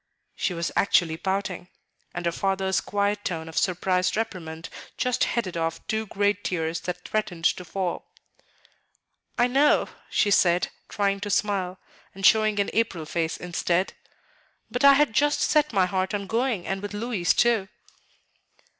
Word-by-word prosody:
She 180 - -1
was 170 0 -2
actually 170 -5 +3
pouting; 190 0 -3 0.4
and 175 0 -5
her 170 - +2
father's 190 +1 0
quiet 205 0 -1
tone 160 -2 -3
of 160 - -9
surprised 185 +1 +1
reprimand 170 -7 -4 0.3
just 250 -1 +1
headed 205 -7 -2
off 165 -1 -2
two 220 0 -2
great 205 +1 0
tears 165 -2 -1
that 180 0 -6
threatened 180 -6 -2
to 180 - +2
fall. 180 +1 -4 1.3
"I 240 - +4
know," 275 +4 +3 0.2
she 205 - +2
said, 175 -2 +3 0.2
trying 200 -1 0
to 205 +1 -4
smile, 195 -3 0 0.4
and 195 0 -3
showing 215 0 +4
an 200 - 0
April 195 -8 0
face 160 +1 -2
instead; 180 +1 -1 0.8
"but 245 - -2
I 280 0 +9
had 280 -4 +3
just 290 +4 +2
set 300 -1 +3
my 195 -4 +3
heart 185 +2 -1
on 200 -1 -3
going, 230 -3 -1
and 195 0 -3
with 205 0 -6
Louis 205 -6 0
too." 230 -5 +2
195 Hz, 155 wpm, -25 LUFS, 175-215 Hz, 1.3 s, I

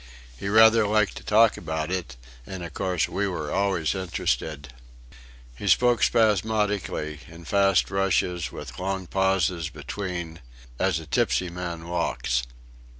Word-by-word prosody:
He 80 - -6
rather 110 0 +6
liked 105 -1 +2
to - - -9
talk 110 +1 +4
about 80 0 -3
it, 90 -10 -3 0.3
and 95 -2 -6
of 85 -4 -8
course 90 -4 0
we 100 +1 -1
were 80 -6 -4
always 95 -5 +1
interested. 80 -6 -3 0.8
He 100 - -6
spoke 120 +6 +4
spasmodically, 105 -8 +1
in 85 0 -13
fast 100 0 +2
rushes 95 -3 0
with - - -9
long 95 0 -2
pauses 95 -3 0
between, 85 -4 -6 0.4
as 95 -4 +2
a 80 - -10
tipsy 85 +4 0
man 85 -2 -6
walks.... 85 -8 -1
90 Hz, 135 wpm, -25 LUFS, 85-100 Hz, 0.8 s, rather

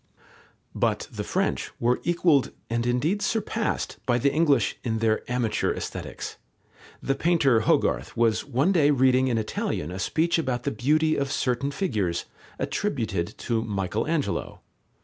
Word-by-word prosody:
But - - 0
the - - -4
French - - -1
were 120 +1 +2
equalled 170 -5 +3 0.2
and 115 +1 0
indeed 150 +12 +1
surpassed 220 +1 -1
by 120 -1 +3
the 140 +3 +2
English 145 -7 +3
in 115 -2 -1
their 110 -1 +1
amateur 120 -4 0
Aesthetics. - - -6 0.7
The 135 - +1
painter 140 -5 +3
Hogarth 110 - +1
was 115 -2 +2
one 135 +10 +1
day 155 -6 +4
reading 130 -2 +4
in 120 -3 +1
Italian 95 -7 -2
a 95 - -5
speech 165 - +1
about 125 -6 -1
the 140 - -1
beauty 155 +5 +2
of 140 -1 -1
certain 125 +2 0
figures, 105 - -1 0.3
attributed 110 - -2
to 115 -2 -1
Michael 105 +1 -2
Angelo. 160 -3 -2
130 Hz, 145 wpm, -26 LUFS, 115-155 Hz, 0.7 s, day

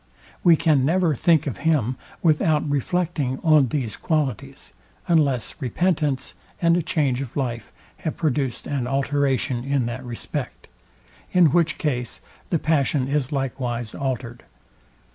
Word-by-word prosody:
We 170 -2 +7
can 150 -4 +3
never 170 +2 +2
think 160 +3 +3
of 140 - -3
him 140 -7 +1 0.3
without 155 -2 +2
reflecting 145 -2 -1
on 155 -4 +5
these 120 -5 -2
qualities; 140 -3 -3 0.3
unless 145 -8 +2
repentance 145 0 0 0.3
and 170 -1 +4
a 175 - +2
change 145 -6 0
of 135 -1 -6
life 120 -5 -3 0.3
have 160 - -4
produced 140 -5 -1
an 135 -4 -2
alteration 135 -2 0
in 135 -2 0
that 120 +2 -4
respect: 120 -2 -6 0.7
In 175 -5 +5
which 170 -1 +2
case 125 -6 -2 0.3
the 170 - +2
passion 145 -4 +1
is 140 -2 -1
likewise 125 -4 -3
altered. 125 -3 -4
140 Hz, 130 wpm, -23 LUFS, 130-155 Hz, 0.7 s, We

